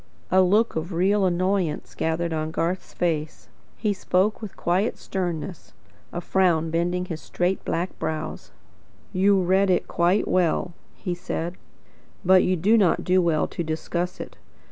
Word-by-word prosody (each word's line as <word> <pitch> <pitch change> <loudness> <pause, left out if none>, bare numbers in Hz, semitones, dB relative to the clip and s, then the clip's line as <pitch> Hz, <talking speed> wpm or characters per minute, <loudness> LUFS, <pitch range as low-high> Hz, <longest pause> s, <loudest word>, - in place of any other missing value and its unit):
A 190 +1 +6
look 210 +5 +3
of 165 +3 -3
real 195 +4 +2
annoyance 180 -2 0
gathered 160 +1 -1
upon 155 0 -2
Garth's 170 +3 -2
face. 160 -3 -2 0.3
He 210 -2 0
spoke 195 +3 +1
with 215 -4 -8
quiet 185 +6 0
sternness, 180 -1 -4 0.4
a 175 - -3
frown 170 -4 +2
bending 175 +2 0
his 165 -3 -6
straight 180 +2 -1
black 175 +3 -3
brows. 155 -1 -4 0.6
"You 195 +1 +4
read 190 +2 +3
it 180 - +2
quite 175 +4 +2
well," 175 0 +1 0.2
he 180 - -3
said, 175 -1 -4 0.7
"but 185 0 +7
you 185 - +2
do 210 +7 +4
not 190 -5 +3
do 185 0 +3
well 165 -3 +2
to 170 - -4
discuss 170 +3 -3
it. - - -8
180 Hz, 150 wpm, -24 LUFS, 165-190 Hz, 0.7 s, but